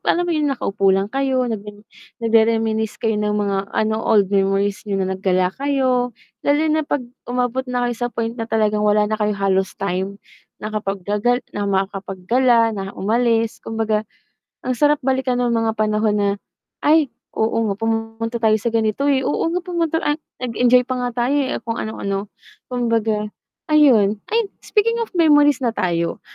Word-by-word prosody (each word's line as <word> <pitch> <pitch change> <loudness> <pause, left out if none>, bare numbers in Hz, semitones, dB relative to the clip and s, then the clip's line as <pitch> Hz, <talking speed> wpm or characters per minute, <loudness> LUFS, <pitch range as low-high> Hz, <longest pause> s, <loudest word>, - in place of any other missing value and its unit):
alam 350 +1 +2
mo 345 - -1
yung 300 -2 +1
naka 275 - -3
upo 195 -1 +1
lang 195 +1 +1
kayo 265 -2 +1
nag 225 -4 -3 0.6
nagrereminisce 225 -1 +2
kayo 225 -3 -1
ng 210 0 0
mga 200 -1 0 0.2
ano 220 0 0
old 205 -4 +2
memories 195 0 +1
niyo 195 -1 0
na 190 - -2
naggala 185 -1 +1
kayo 260 -3 0 0.2
lalo 290 +1 +2
na 315 - +2
pag 275 -4 -1 0.2
umabot 250 +1 -1
na 245 0 0
kayo 240 - -2
sa 245 0 -2
point 230 0 -2
na 225 - -3
talagang, 215 -1 +1
wala 210 0 +3
na 215 +1 -1
Kayong 210 -1 +1
halos 195 -1 0
time 195 +1 -2 0.4
na 215 - -6
kapag 195 -3 -3
gagal 235 +5 0
na 205 -1 -2
makakapaggala 200 +5 +1
na 195 -2 -6
umalis 230 +2 +1
kumbaga, 220 -1 -2 0.5
ang 255 -1 -2
sarap 295 +1 +3
balikan 260 -1 0
ng 240 - +1
mga 225 -1 +1
panahon 215 0 +1
na 205 -1 +2 0.6
ay 300 -2 +4 0.2
oo, 225 0 +1
nga 200 - 0
pumunta 225 +2 -2
tayo 220 -1 +3
sa 235 - 0
ganito 225 +5 +1
eh, 265 -1 +1
oo, - - 0
nga 350 - 0
pumunta 340 -3 -1
Ang 295 -1 0 0.2
nag-Enjoy 250 +1 +3
pa 255 - -2
nga 245 0 -1
tayo 280 - +1
eh, 280 -2 0
kung 230 0 -2
ano 220 0 -6
ano 200 +1 -3 0.4
kumbaga 225 -3 0 0.5
ayun 220 -9 +5
ay 455 0 +1 0.2
speaking 460 +2 +1
of 460 - -2
memories 295 -4 +5
na 235 - +1
tayo 170 -5 -1
225 Hz, 175 wpm, -20 LUFS, 205-255 Hz, 0.6 s, ayun